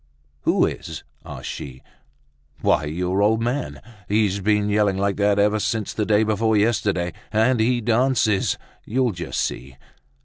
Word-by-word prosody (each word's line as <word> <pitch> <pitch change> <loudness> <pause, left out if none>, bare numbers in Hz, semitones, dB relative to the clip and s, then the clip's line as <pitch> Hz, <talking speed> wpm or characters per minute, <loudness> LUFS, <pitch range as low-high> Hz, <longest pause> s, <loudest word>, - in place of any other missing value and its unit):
"Who - - +3
is?" - - -6 0.2
asked - - -9
she. 65 -2 -8 0.8
"Why, 75 - +2
your 90 +5 -1
old 110 +2 +3
man! 125 +4 -3 0.3
He's 105 -1 +1
been 105 +1 +1
yelling 105 -2 +2
like 100 0 0
that 100 0 +2
ever 105 +1 +3
since 110 0 -2
the 105 -2 -2
day 105 0 +4
before 110 0 +1
yesterday; 100 -5 +1 0.2
and 115 +3 +2
he 120 +2 +2
dances, 115 -3 +2 0.3
you'll 125 +1 0
just 90 -3 -5
see." 65 +1 -4
105 Hz, 145 wpm, -22 LUFS, 100-110 Hz, 0.8 s, day